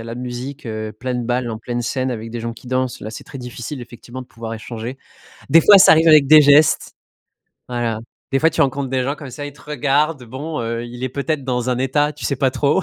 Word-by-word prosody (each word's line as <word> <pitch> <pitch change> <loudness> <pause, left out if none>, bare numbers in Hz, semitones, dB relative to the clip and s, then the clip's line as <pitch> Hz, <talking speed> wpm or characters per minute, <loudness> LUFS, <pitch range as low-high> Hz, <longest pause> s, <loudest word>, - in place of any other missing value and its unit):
a 115 - -8
la 115 +1 -6
musique, 125 +2 -6
heu, 110 -1 -4
pleine 125 +1 -4
balle, 120 0 -1
en 110 -1 -5
pleine 120 +1 -4
scène, 130 +2 -2
avec 115 -1 -5
des 120 - -5
gens 115 +1 -4
qui 115 +2 -15
dansent. 130 0 -1
Là, 110 - -6
c'est 110 - -8
très 140 - -10
difficile, 125 +2 -7
effectivement, 120 +1 -10
de 125 - -10
pouvoir 115 +1 -7
échanger. 115 +3 -7 0.5
Des 165 - +7
fois, 205 +4 +8
ça - - +8
arrive 160 +1 +5
avec 150 -3 +7
des 155 +1 +9
gestes. 145 +1 +4 0.8
Voilà. 120 -3 -2 0.3
Des 135 - +3
fois, 160 +3 +4
tu 165 - -3
rencontres 135 0 -1
des 130 0 0
gens 140 - -1
comme 140 -3 -10
ça. 145 +4 -7
Ils 145 - -8
te 140 - -19
regardent. 150 -1 0
Bon, 145 +7 -6
heu, 115 +1 -3
il 120 +2 -7
est - - -1
peut-être 140 0 -2
dans 125 -1 -1
un 125 - 0
état, 145 +3 +1
tu - - -9
sais 140 - 0
pas 135 0 +2
trop. 145 +8 +1
130 Hz, 250 wpm, -20 LUFS, 120-145 Hz, 0.8 s, des